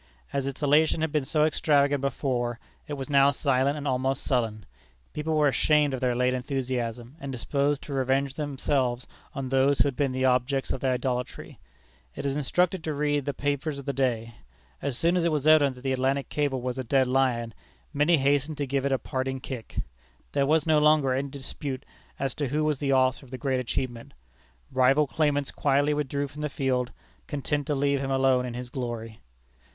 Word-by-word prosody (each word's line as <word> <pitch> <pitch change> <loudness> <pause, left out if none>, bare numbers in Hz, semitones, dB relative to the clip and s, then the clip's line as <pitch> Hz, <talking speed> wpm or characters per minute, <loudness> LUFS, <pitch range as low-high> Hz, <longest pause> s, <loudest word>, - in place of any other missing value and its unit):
As 140 -1 -1
its 140 +2 -5
elation 155 +2 +3
had 160 -1 0
been 150 -3 0
so 150 +2 +2
extravagant 145 -2 +2
before, 125 -4 -1 0.3
it 150 - -4
was 135 -2 -4
now 140 -1 +5
silent 140 0 +1
and 145 -1 -4
almost 130 +1 0
sullen. 115 -5 -1 0.5
People 155 +1 -2
were 150 -1 +4
ashamed 145 +1 +3
of 130 - -3
their 125 -2 +1
late 125 +1 +2
enthusiasm, 125 -1 -3
and 140 -3 -5
disposed 140 +4 -1
to 145 - -7
revenge 135 +1 +1
themselves 135 -4 -1 0.3
on 135 -2 -3
those 135 +1 +3
who - - +5
had 140 - -2
been 140 -1 0
the 130 0 0
objects 130 +2 +1
of - - -2
their 130 -1 +2
idolatry. 125 0 -3 0.6
It - - -5
is 140 -1 0
instructive 180 +5 +1
to 155 -2 -3
read 145 -1 0
the 145 - -1
papers 145 +1 -2
of 140 - -8
the 140 - -1
day. 120 -3 -1 0.5
As 135 -3 -2
soon 170 +2 +2
as 180 - +2
it 170 - +2
was 150 -2 -1
evident 150 -4 +5
that 125 - -13
the 135 -1 0
Atlantic 135 +1 0
cable 140 -4 -1
was 125 0 -3
a - - -2
dead 130 +2 +2
lion, 125 -3 +1 0.4
many 150 +4 +4
hastened 145 +2 +1
to 145 - -1
give 135 0 0
it - - -2
a 135 - +3
parting 130 +2 -3
kick. 125 -3 -7 0.6
There 140 -1 +1
was 155 0 +3
no 155 -2 +4
longer 150 -3 +4
any 135 +2 -1
dispute 135 0 -6 0.3
as 135 0 -2
to 145 -2 -2
who 150 +4 0
was 150 -3 0
the 140 -2 0
author 130 0 +2
of 135 - -15
the 130 - -6
great 130 0 0
achievement. 120 - -4 0.6
Rival 135 +3 +4
claimants 145 -1 0
quietly 145 +1 +2
withdrew 145 -1 -1
from 145 +2 -9
the 150 - -1
field, 130 -3 -1 0.4
content 145 0 -2
to 150 - 0
leave 140 0 +1
him 135 0 -3
alone 130 -1 +2
in 120 - -6
his 125 0 -6
glory. 115 -4 -5
135 Hz, 200 wpm, -27 LUFS, 130-145 Hz, 0.6 s, now